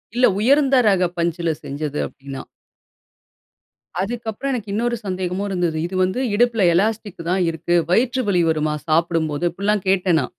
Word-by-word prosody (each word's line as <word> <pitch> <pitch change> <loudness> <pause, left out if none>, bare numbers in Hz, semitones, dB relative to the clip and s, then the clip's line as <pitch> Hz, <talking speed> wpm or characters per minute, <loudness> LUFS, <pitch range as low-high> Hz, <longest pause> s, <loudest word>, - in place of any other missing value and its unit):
இல்ல 250 +1 +4
உயர்ந்த 275 +4 +4
ரக 190 -3 +3
பஞ்சில 170 -1 0
செஞ்சது 145 +1 -4
அப்படின்னா. 135 -1 -9 1.6
அதுக்கு 230 +4 -4
அப்புறம் 275 +6 -3
எனக்கு 215 -5 -4
இன்னொரு 235 +2 0
சந்தேகமும் 185 +1 -2
இருந்தது. 175 -4 -1
"இது 185 - -7
வந்து 185 +7 -1 0.2
இடுப்பில 230 -3 +3
எலாஸ்டிக் 210 -1 -1
தான் 185 +1 +1
இருக்கு. 165 +1 -1 0.2
வயிற்று 250 +5 +2
வலி 180 -3 +3
வருமா, 155 -1 0
சாப்பிடும்போது?" 165 0 +1
இப்படில்லாம் 200 +2 -1
கேட்டேன் 180 -4 +3
நான். 125 - -6
185 Hz, 145 wpm, -21 LUFS, 165-220 Hz, 1.6 s, இல்ல